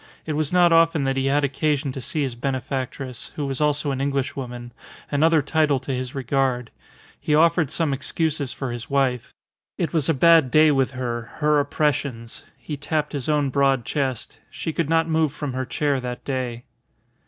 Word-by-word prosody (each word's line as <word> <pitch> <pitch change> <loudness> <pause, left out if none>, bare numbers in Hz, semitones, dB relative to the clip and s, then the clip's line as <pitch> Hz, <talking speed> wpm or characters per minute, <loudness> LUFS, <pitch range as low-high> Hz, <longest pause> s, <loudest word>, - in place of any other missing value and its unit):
It 155 - -2
was 150 -1 0
not 175 -2 +5
often 165 -2 +4
that 135 0 0
he 135 0 0
had 145 +2 +2
occasion 140 0 0
to 130 - -6
see 150 +5 -1
his 130 -3 -2
benefactress, 130 0 -4
who 145 - -2
was 135 +1 -3
also 150 -1 +1
an 135 0 -2
Englishwoman 130 -3 -3 0.4
another 155 +1 +3
title 150 -1 +2
to 130 +1 -4
his 130 0 -4
regard. 130 -2 -1 0.5
He 150 - +1
offered 165 -1 +3
some 160 -2 0
excuses 145 0 -1
for 135 -3 -4
his 120 0 -6
wife. 135 -3 0 0.5
It 165 -4 -2
was 160 -2 +1
a 160 - +3
bad 165 -1 +5
day 155 +3 +5
with 135 -2 +2
her; 120 -3 -4
her 150 -1 +2
oppressions 140 -5 -2
he 150 - -6
tapped 150 +2 -2
his 140 -1 -3
own 145 -3 +1
broad 135 -3 +2
chest. 130 0 -3
She 160 - -5
could 165 -3 -1
not 165 0 +3
move 160 -3 +1
from 145 -4 -4
her 130 0 -2
chair 140 +1 0
that 125 -1 -6
day. 125 -3 -3
140 Hz, 185 wpm, -23 LUFS, 130-155 Hz, 0.5 s, not